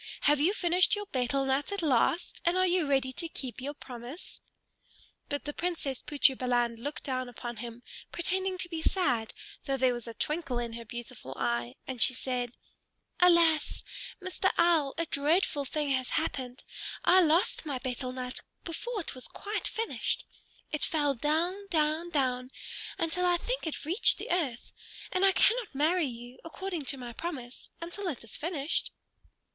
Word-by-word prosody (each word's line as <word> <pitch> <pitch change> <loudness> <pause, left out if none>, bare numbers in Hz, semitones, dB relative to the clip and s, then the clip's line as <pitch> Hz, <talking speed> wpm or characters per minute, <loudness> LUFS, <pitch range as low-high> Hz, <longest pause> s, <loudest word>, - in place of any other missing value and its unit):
"Have 295 -1 +4
you 320 +6 +4
finished 355 +1 +4
your 415 0 -4
betel 270 - 0
nut 270 +6 +1
at 400 -3 -2
last, 300 +4 +2
and 345 +2 +3
are 370 - +5
you 355 -3 +2
ready 270 -2 +2
to 335 +4 -2
keep 255 -4 -4
your 285 +3 -4
promise?" 250 +4 -8 0.9
But 285 - -2
the 295 - -3
Princess 325 -7 -2
Putri 280 -2 +3
Balan 240 -2 +1
looked 285 +6 -4
down 255 -2 -2
at 245 - -12 0.2
him, 235 +1 -7 0.3
pretending 375 +2 0
to 355 - 0
be 325 -2 -3
sad, 250 - +1 0.3
though 275 -2 0
there 255 -1 +4
was 240 -1 -6
a 230 - -7
twinkle 300 -1 -1
in 235 -1 -2
her 230 0 -7
beautiful 235 - -7
eye; 120 +1 -1
and 255 -3 -5
she 255 - +5
said, 250 -2 -2 0.7
"Alas! 335 -4 +5 0.4
Mr. 375 0 0
Owl, 330 -5 +4
a 335 - +1
dreadful 295 0 +2
thing 295 +1 -1
has 260 -2 +1
happened. 260 -6 -2 0.4
I 370 +2 +7
lost 335 +2 +3
my 280 -3 -1
betel 255 0 -3
nut, 255 0 -4 0.2
before 420 +6 -3
it - - -6
was 255 - -5
quite 415 +1 -3
finished. 455 0 -1 0.5
It 300 - -1
fell 290 -3 +2
down, 335 - 0
down, 315 +1 +1
down, 255 -5 0 0.5
until 330 +2 0
I 350 -1 +4
think - - -2
it 305 - -4
reached 355 +9 +6
the - - -5
earth. 290 -10 -1 0.4
And 370 0 +1
I 390 - +7
cannot 455 - +3
marry 315 +3 +3
you, 240 0 -9
according 340 -2 -4
to 275 +1 -1
my 245 -2 -7
promise, 255 -4 -6
until 350 +4 -5
it 285 -10 -3
is 225 - -6
finished." 315 -2 -1
295 Hz, 170 wpm, -30 LUFS, 255-345 Hz, 0.9 s, I